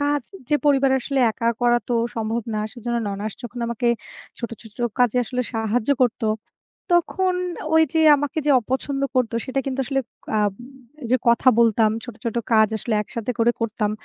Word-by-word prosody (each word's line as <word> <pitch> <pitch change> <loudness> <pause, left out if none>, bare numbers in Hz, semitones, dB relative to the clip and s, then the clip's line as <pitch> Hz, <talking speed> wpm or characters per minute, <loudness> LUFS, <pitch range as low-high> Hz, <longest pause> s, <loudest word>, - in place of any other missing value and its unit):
কাজ 290 -1 +1 0.3
যে 295 - +4
পরিবার 275 -2 +4
আসলে 275 +2 -2
একা 230 +2 -1
করা 240 0 +4
তো 245 - +1 0.2
সম্ভব 225 +1 -1
না। 215 - -1
সেজন্য 235 0 -3
ননাশ 205 +2 -4
যখন 240 0 -7
আমাকে 235 +1 -1 0.5
ছোট, 235 - -4
ছোট 220 0 -16 0.2
কাজে 245 -1 +3
আসলে 250 +2 -2
সাহায্য 225 +3 0
করতো, 230 -1 +1 0.7
তখন 365 +2 +2 0.4
ওইযে 320 0 +3 0.2
আমাকে 290 +3 -3
যে 295 - +4
অপছন্দ 265 +4 -2
করতো, 240 -2 +1
সেটা 260 +1 -1
কিন্তু 270 0 -3
আসলে 270 +1 0 0.4
আম 210 -1 +2 0.6
যে 255 - +5
কথা 235 +2 +5
বলতাম, 225 -1 +4
ছোট, 240 -3 -8
ছোট 230 -1 -3 0.2
কাজ 220 -1 +6
আসলে 220 +2 -3
একসাথে 230 +3 -4
করে 230 +1 +4
করতাম, 215 -2 -1
240 Hz, 165 wpm, -22 LUFS, 225-270 Hz, 0.7 s, কাজ